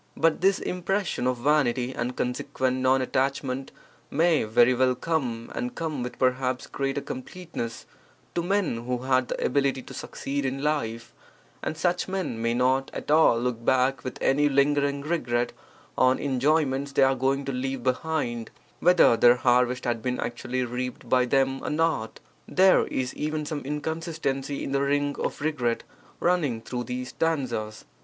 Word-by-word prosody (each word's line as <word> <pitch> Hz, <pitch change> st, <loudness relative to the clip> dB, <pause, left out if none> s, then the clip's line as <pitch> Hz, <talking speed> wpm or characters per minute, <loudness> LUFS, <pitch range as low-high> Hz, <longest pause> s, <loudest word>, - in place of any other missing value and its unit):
But 165 Hz, 0 st, +2 dB
this 195 Hz, +1 st, +4 dB
impression 180 Hz, -5 st, -1 dB
of 125 Hz, -1 st, 0 dB
vanity 130 Hz, -2 st, +1 dB
and 125 Hz, +1 st, -3 dB
consequent 130 Hz, +1 st, -1 dB
non 130 Hz, 0 st, +3 dB
attachment 135 Hz, 0 st, -1 dB, 0.4 s
may 160 Hz, -3 st, +2 dB
very 120 Hz, +3 st, +4 dB
well 130 Hz, 0 st, +2 dB
come, 125 Hz, -6 st, -2 dB
and 250 Hz, 0 st, -4 dB
come 155 Hz, -5 st, -3 dB
with 125 Hz, 0 st, -5 dB
perhaps 130 Hz, 0 st, 0 dB
greater 135 Hz, +1 st, -2 dB
completeness, 130 Hz, -3 st, -6 dB, 0.5 s
to 170 Hz, -, 0 dB
men 175 Hz, -, 0 dB
who 125 Hz, 0 st, -2 dB
had 130 Hz, -1 st, +2 dB
the -, -, -2 dB
ability 135 Hz, -1 st, +1 dB
to -, -, -11 dB
succeed 140 Hz, +1 st, -4 dB
in 135 Hz, +1 st, -2 dB
life, 115 Hz, -7 st, -2 dB, 0.5 s
and 155 Hz, -, -3 dB
such 175 Hz, +1 st, 0 dB
men 185 Hz, -12 st, -3 dB
may 115 Hz, 0 st, +1 dB
not 130 Hz, +2 st, +2 dB
at -, -, -4 dB
all 155 Hz, -7 st, +5 dB
look 120 Hz, -1 st, -2 dB
back 130 Hz, 0 st, +2 dB
with 130 Hz, -, -5 dB
any 145 Hz, +2 st, +3 dB
lingering 140 Hz, 0 st, +2 dB
regret 120 Hz, -7 st, -1 dB, 0.4 s
on 130 Hz, 0 st, +4 dB
enjoyments 140 Hz, 0 st, +1 dB
they 135 Hz, -, +4 dB
are 135 Hz, 0 st, +4 dB
going 135 Hz, +2 st, 0 dB
to 135 Hz, -, -2 dB
leave 130 Hz, 0 st, -3 dB
behind, 125 Hz, -3 st, -1 dB, 0.3 s
whether 180 Hz, -8 st, +5 dB
their 120 Hz, +1 st, +6 dB
harvest 125 Hz, 0 st, +2 dB
had 120 Hz, -2 st, -1 dB
been 125 Hz, +1 st, -2 dB
actually 125 Hz, +1 st, -2 dB
reaped 125 Hz, +1 st, -5 dB
by 125 Hz, -1 st, +3 dB
them 135 Hz, +1 st, +1 dB
or -, -, -2 dB
not. 155 Hz, -8 st, 0 dB, 0.3 s
There 190 Hz, 0 st, +4 dB
is 130 Hz, -1 st, -2 dB
even 155 Hz, 0 st, -2 dB
some 150 Hz, 0 st, -3 dB
inconsistency 150 Hz, -1 st, -3 dB
in -, -, -4 dB
the 140 Hz, 0 st, +1 dB
ring 145 Hz, 0 st, +1 dB
of -, -, -3 dB
regret 130 Hz, -7 st, 0 dB, 0.4 s
running 160 Hz, -10 st, +1 dB
through 120 Hz, +2 st, -5 dB
these 125 Hz, +1 st, -4 dB
stanzas. 125 Hz, -10 st, -2 dB
135 Hz, 160 wpm, -26 LUFS, 125-150 Hz, 0.5 s, their